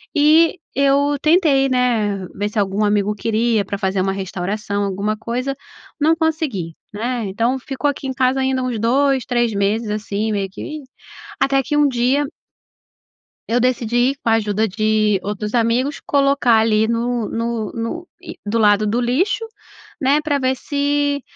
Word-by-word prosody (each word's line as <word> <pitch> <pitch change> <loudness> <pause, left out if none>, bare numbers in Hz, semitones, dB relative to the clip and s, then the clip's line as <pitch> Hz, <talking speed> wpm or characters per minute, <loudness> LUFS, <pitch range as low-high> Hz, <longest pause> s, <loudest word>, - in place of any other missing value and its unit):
e 315 +4 +5 0.2
eu 280 +1 +2
tentei, 305 -5 +4
né, 225 -7 0
ver 205 +1 -2
se 215 - -8
algum 200 +1 +1
amigo 205 0 +1
queria, 220 0 0
pra 200 - -4
fazer 190 0 -1
uma 195 +1 0
restauração, 195 +2 -3
alguma 200 +2 -2
coisa. 250 +5 -3 0.5
Não 315 +2 +3
consegui, 310 - -2 0.2
né? 235 +2 -2
Então, 230 +7 0
ficou 270 +3 -2
aqui 280 -1 -4
em 260 - -2
casa 255 +1 +1
ainda 265 -1 0
uns 245 -4 -2
2, 265 +2 +2
3 240 -3 0
meses 210 +3 0
assim, 210 +1 -2
meio 200 -2 -1
que - - -10
e 305 -2 -6 0.6
Até 275 0 +2
que 295 +4 -2
um 295 -1 +4
dia 260 +3 +1 1.2
eu 240 +2 +2
decidi, 245 +1 +1
com 230 - 0
a - - +4
ajuda 220 0 +1
de 215 0 +1
outros 210 +1 -4
amigos, 245 +4 +1
colocar 275 -5 +3
ali 220 0 +2
no 235 -1 -1
no 230 -1 -3
no, 290 +10 -4 0.2
eh, - - -8
do 215 +3 -1
lado 210 -1 +4
do 235 +4 0
lixo, 380 - 0 0.6
né? 280 +3 +3
Pra 290 -2 0
ver 260 0 +1
se 285 +1 0
235 Hz, 165 wpm, -19 LUFS, 210-275 Hz, 1.2 s, e